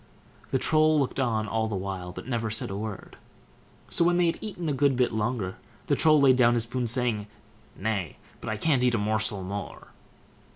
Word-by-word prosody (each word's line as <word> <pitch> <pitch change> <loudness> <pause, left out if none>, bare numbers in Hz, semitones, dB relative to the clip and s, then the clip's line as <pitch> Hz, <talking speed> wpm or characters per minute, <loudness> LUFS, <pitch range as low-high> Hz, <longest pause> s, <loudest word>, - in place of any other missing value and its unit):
The - - +1
Troll 155 +2 +4
looked 140 0 -1
on 110 -4 0
all 110 +1 0
the 110 - -3
while, 95 -2 -4
but - - -8
said 130 - -8
never 115 -2 -1 0.2
a 95 - -5
word. 105 -1 -6 0.7
So - - +2
when 175 +1 +3
they 175 - +3
had 165 - 0
eaten 185 -6 -5
a 150 - 0
good 140 0 +2
bit 125 -2 +1
longer, 110 -3 -2 0.3
the - - +2
Troll 155 -1 +5
laid 135 -2 +5
down 120 -1 +5
his 115 - +1
spoon, 125 +1 -3
saying, 115 -3 0 0.5
"Nay! 100 -6 -3 0.2
but - - -6
I 110 - -2
can't 135 0 +2
eat 125 -1 +3
a - - +1
morsel 105 -1 0
more." 95 -4 -6
120 Hz, 205 wpm, -27 LUFS, 105-135 Hz, 0.7 s, Troll